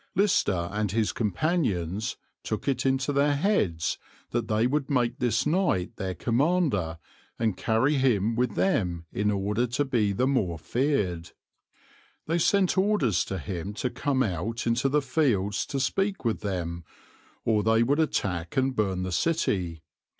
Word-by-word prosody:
Lister 105 - +2
and 105 -2 -1
his 110 0 +1
companions 105 - -1 0.2
took 110 - -4
it 135 -1 +1
into 135 +1 +1
their 145 +1 +3
heads 110 - 0 0.3
they 110 -1 +1
would 140 +2 0
make 125 -3 +1
this 115 -2 +1
knight 150 - +1
their 95 -2 -3
commander 120 - +1 0.4
and 110 -4 0
carry 115 +9 +1
him 115 -4 +2
with 120 -3 0
them 90 - 0
in 105 +1 +1
order 105 +4 0
to 130 +5 0
be 115 -6 +1
the 110 +6 +1
more 110 -11 0
feared. 95 - -1 0.9
They 165 +2 0
sent 190 +1 +3
orders 150 - +2
to 95 - -4
him 90 +5 -5
to 125 +2 -2
come 135 -3 0
out 110 +3 -3
into 120 +4 +1
the 150 +1 +2
fields 115 -7 +1
to 140 - -2
speak 195 +5 -1
with 115 - 0
them, 85 -4 -3 0.6
or 110 -2 +3
they 110 +2 +3
would 140 +6 +1
attack 90 - -1
and 130 0 +1
burn 95 -3 0
the 95 - -3
city. 90 - 0
115 Hz, 150 wpm, -27 LUFS, 95-140 Hz, 0.9 s, their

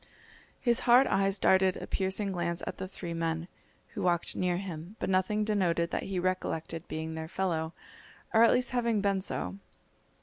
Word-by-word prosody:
His 240 -2 +2
hard 250 +3 +8
eyes 195 -2 +2
darted 190 -1 +4
a - - -6
piercing 195 +1 -1
glance 170 -2 -2
at - - -5
the 190 - -4
three 175 -2 -6
men, 165 0 -2 0.4
who - - -6
walked 175 -1 +1
near 180 -1 0
him, 180 0 -6
but - - -2
nothing 190 +3 +2
denoted 180 -5 +1
that - - -2
he 190 - -2
recollected 175 -3 -2
being 160 +1 -4
their 160 0 -5
fellow, 165 -3 -1 0.6
or 220 - +6
at 230 - +7
least 250 +1 +2
having 235 -4 +1
been 195 -1 +1
so. 195 +1 -3
185 Hz, 175 wpm, -30 LUFS, 170-200 Hz, 0.6 s, hard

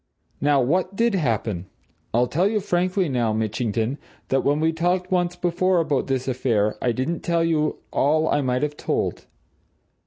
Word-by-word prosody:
Now, 145 -1 +3
what 180 +8 0
did 235 +1 +2
happen? 110 - -1 0.4
I'll 120 +2 +3
tell 170 +9 +1
you 215 0 +1
frankly, 185 0 0
now, 120 -5 0
Mitchington, 110 +3 -1 0.3
that 135 0 +2
when 145 +1 +2
we 160 +1 +2
talked 180 +3 0
once 175 -1 +1
before 175 +1 +1
about 150 -5 0
this 130 -1 -1
affair, 115 -5 +1
I 125 - +2
didn't 130 +8 -2
tell 170 -1 0
you 155 -2 +1
all 155 +3 +2
I 145 - +2
might 125 0 0
have 150 0 -2
told. - - -2
150 Hz, 165 wpm, -23 LUFS, 125-175 Hz, 0.4 s, Now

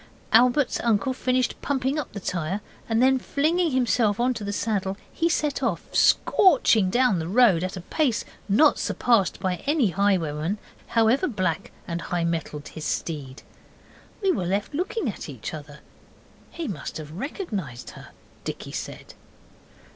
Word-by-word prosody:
Albert's 250 +4 +4
uncle 235 +2 +1
finished 255 -1 0
pumping 270 +1 0
up 290 - -5
the 200 - -6
tyre, 180 +2 -2 0.3
and 225 +2 +3
then 265 0 +4
flinging 325 +7 +1
himself 235 -5 +2
into 240 -3 0
the 205 - -3
saddle 200 -2 -1 0.2
he 335 - +1
set 300 -4 0
off, 220 -10 -1
scorching 255 - +4
down 240 -3 +3
the 160 - -3
road 195 -4 +4
at 185 0 -3
a - - -5
pace 255 - 0 0.2
not 290 +10 +5
surpassed 230 -7 +1
by 185 -1 -1
any 290 -7 +3
highwayman, 180 -2 0 0.3
however 235 +9 +3
black 185 - -2 0.2
and 170 0 -3
high 175 -1 -2
mettled 160 -3 -3
his 160 - -8
steed. 145 -6 -4 0.8
We 385 - +4
were 185 - -1
left 200 - -1
looking 360 - -2
at 200 - -5
each 130 -6 -6
other. 150 -1 -9 0.7
'He 335 -3 -5
must 185 - -5
have 155 -1 -8
recognized 195 - -5
her,' - - -12 0.4
Dicky - - -6
said. - - -7
210 Hz, 150 wpm, -25 LUFS, 175-260 Hz, 0.8 s, not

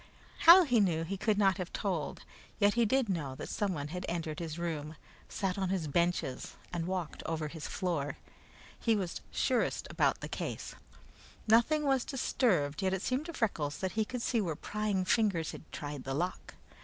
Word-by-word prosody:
How 360 +3 +11
he 245 -7 +3
knew 170 -5 +2
he 185 +4 -3
could 210 +1 +1
not 195 -2 +3
have 180 -2 -4
told, 180 -7 -2 0.3
yet 205 -1 +4
he 235 -1 +3
did 260 +2 +2
know 150 -9 -2
that - - -7
someone 175 -9 -2
had 180 +3 -4
entered 165 -3 -3
his 165 -2 -4
room, 160 -3 -3 0.3
sat 195 -1 -2
on 190 -1 0
his 185 -4 0
benches, 170 -4 0 0.2
and 170 -1 -2
walked 180 -4 -3
over 160 -2 -2
his 160 0 -6
floor. 165 -7 -2 0.6
He 225 -2 +2
was 190 -4 -3
surest 250 -2 0
around - - +4
the - - -5
case. - - -4 0.7
Nothing 235 +8 +4
was 270 -3 +2
disturbed, 190 - +1
yet 190 0 +1
it 190 - -5
seemed 265 +5 -1
to 335 - -6
Freckles 155 - -1
that 190 -1 -2
he 220 - +1
could 245 +2 -5
see 235 -3 +1
where 165 -6 -2
prying 205 +1 -1
fingers 190 -6 +2
had - - -11
tried 145 -2 -5
the 135 0 -3
lock. 175 +5 -3
185 Hz, 185 wpm, -32 LUFS, 160-215 Hz, 0.7 s, How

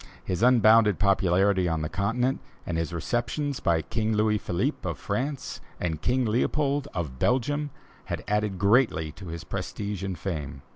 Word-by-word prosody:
His 90 +1 -2
unbounded 115 -4 +6
popularity 95 -1 +3
on 80 -1 -1
the - - -1
Continent 120 - 0 0.3
and 85 - -3
his 80 +1 -1
receptions 120 - -2
by 85 -3 +1
King 110 -1 -1
Louis 105 0 +2
Philippe, 85 - -1
of - - -4
France, 140 +1 -3 0.2
and 80 -3 -2
King 125 +1 +1
Leopold, 140 +5 +1
of 75 -8 -4
Belgium, 145 +4 +1 0.4
had - - -4
added 105 -2 0
greatly 100 - +3
to 95 +4 -11
his 85 0 -6
prestige 100 +2 -4
and 95 -3 -3
fame. 75 -7 -5
100 Hz, 155 wpm, -27 LUFS, 85-120 Hz, 0.4 s, unbounded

